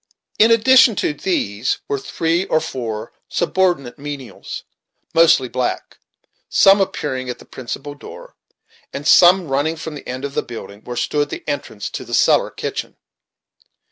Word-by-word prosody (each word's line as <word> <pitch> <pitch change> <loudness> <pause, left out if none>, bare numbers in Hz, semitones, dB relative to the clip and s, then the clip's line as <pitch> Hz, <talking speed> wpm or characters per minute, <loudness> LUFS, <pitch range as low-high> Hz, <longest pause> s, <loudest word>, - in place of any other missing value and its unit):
In 220 - +7
addition 235 +1 +6
to 155 - 0
these, 125 - -1
were 140 - -1
three 165 +6 -1
or 160 - +2
four 120 -8 -5 0.2
subordinate 175 -9 0
menials, 140 -3 -7 0.5
mostly 165 -6 +5
black, 125 0 -3 0.5
some 195 +1 +6
appearing 130 -8 -2
at 125 - -4
the - - -16
principal 135 +3 -7
door, 145 - -12 0.6
and 145 +2 -5
some 180 +1 +6
running 145 +4 0
from 160 -1 -7
the 145 - -10
end 130 +2 -4
of 140 - -5
the - - 0
building, 110 -3 -9
where 120 0 -6
stood 145 +4 0
the - - -6
entrance 110 -7 -4
to - - -5
the - - -3
cellar - - +4
kitchen. - - -5
145 Hz, 150 wpm, -19 LUFS, 130-170 Hz, 0.6 s, In